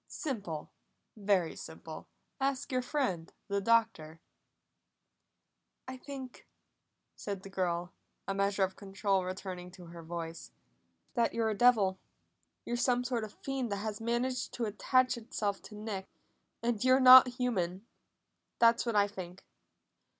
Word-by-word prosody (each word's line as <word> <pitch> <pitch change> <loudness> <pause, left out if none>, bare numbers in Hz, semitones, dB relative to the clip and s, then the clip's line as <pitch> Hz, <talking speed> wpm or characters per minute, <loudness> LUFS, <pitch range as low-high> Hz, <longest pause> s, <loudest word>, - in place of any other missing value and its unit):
"Simple! 200 - -5 0.4
Very 195 -5 +1
simple! - - -9 0.3
Ask 270 -1 -1
your 255 -1 +1
friend 245 - -2 0.2
the 200 0 0
Doctor!" 220 -8 +1 1.7
"I 260 - -5
think," 260 -1 -9 0.7
said 200 -2 -5
the 195 - -10
girl, 175 -1 -1 0.3
a 195 - 0
measure 195 0 +1
of 190 0 -1
control 195 -1 -1
returning 185 -1 -6
to 180 -2 -12
her 170 - -9
voice, 165 0 -6 0.6
"that 235 -2 +1
you're 225 -1 +1
a - - -2
devil. 200 -5 +4 0.7
You're 240 - -2
some 245 0 +2
sort 245 -2 -1
of 215 - -7
a - - -30
fiend 265 -4 -2
that - - +1
has 215 0 -4
managed 245 +2 -1
to 240 - -1
attach 255 +4 +2
itself 210 -3 -3
to 210 - -12
Nick, 210 -3 -5 0.6
and 235 -2 0
you're 255 +1 +5
not 255 0 +10
human. 195 -6 -1 0.7
That's 235 +1 +4
what 230 - 0
I 205 -1 +5
think!" 185 -2 -9
210 Hz, 140 wpm, -32 LUFS, 190-245 Hz, 1.7 s, not